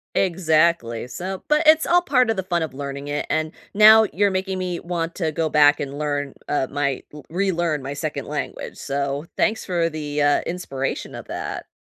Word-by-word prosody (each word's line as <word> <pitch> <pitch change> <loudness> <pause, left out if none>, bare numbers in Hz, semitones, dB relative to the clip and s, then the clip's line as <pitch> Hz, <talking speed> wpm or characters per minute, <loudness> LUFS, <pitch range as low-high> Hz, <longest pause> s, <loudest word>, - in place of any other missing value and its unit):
Exactly. 165 -9 +2
So, 185 +6 -6
but 300 +2 +3
it's 315 0 +6
all 350 +1 +4
part 255 -8 +2
of 220 - -3
the 190 - -1
fun 175 -3 0
of 155 -5 -5
learning 140 +1 -6
it, 145 0 -3
and 155 +1 0 0.2
now 220 +1 +8
you're 200 +1 +2
making 190 0 -2
me 180 -2 -3
want 170 -1 -3
to 160 -4 -1
go 160 +1 -1
back 145 -1 +5
and 140 0 -5
learn, 145 -2 -2
uh, 140 -3 0
my 140 -2 -1
l 150 - -10
relearn 170 -4 0
my 140 +1 -4
second 145 -1 -4
language. 150 0 -5
So 140 +1 -3
thanks 220 0 +1
for 170 -2 0
the, 150 -2 -3
uh, 145 0 +3
inspiration 135 -6 -4
of - - -8
that. - - -5
160 Hz, 195 wpm, -22 LUFS, 145-185 Hz, 0.2 s, now